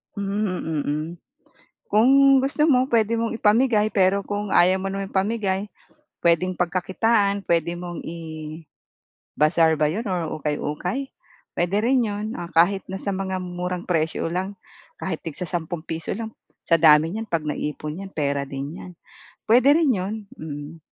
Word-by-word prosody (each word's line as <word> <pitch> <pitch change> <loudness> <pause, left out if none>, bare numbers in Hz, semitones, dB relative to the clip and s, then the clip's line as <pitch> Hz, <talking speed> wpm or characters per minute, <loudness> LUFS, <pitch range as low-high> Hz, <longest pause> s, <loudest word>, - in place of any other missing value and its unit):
Mhm, 200 +1 -2
mm, 170 -6 -2
hmm. 150 +2 -1 0.8
Kung 220 +5 +4 0.3
gusto 300 +2 +2
mo 255 -3 +4
puwede 230 -1 +2
mong 230 0 -1
ipamigay 215 0 +3
pero 195 -1 +2
kung 205 0 -3
ayaw 185 +2 +5
mo 195 - -2
naman 195 0 -3
ipamigay 200 0 -1 0.5
puwedeng 170 +2 +3
pagkakitaan 200 +4 +1
puwede 170 -1 +1
mong 175 -1 -6
i-bazaar 160 -1 -9 1.0
ba 150 - +4
'yon 215 +9 -3
or 175 -5 -2
ukay-ukay? 150 - -3 0.5
Puwede 175 +3 +1
rin 250 +1 +3
'yon, 205 0 -3
ah, 175 - -5
kahit 175 +5 +3
nasa 195 +1 -3
mga 190 -1 -2
murang 180 0 -4
presyo 160 -2 0
lang. 185 +3 -3 0.5
Kahit 175 -4 -3
tig 160 - -4
sa-sampung 170 -1 -4
piso 160 0 -4
lang. 225 +1 -5 0.4
Sa 165 - +6
dami 155 0 +6
niyan 220 +3 -4
'pag 165 -6 -1
naipon 150 +1 -4
'yan 195 0 -8
pera 140 -2 0
din 140 +4 -6
'yan. 180 - -9 0.6
Puwede 250 +5 +5
rin 320 -4 +3
'yon. 190 +3 -2 0.2
Mm. 150 +1 -8
185 Hz, 150 wpm, -23 LUFS, 160-210 Hz, 1.0 s, Sa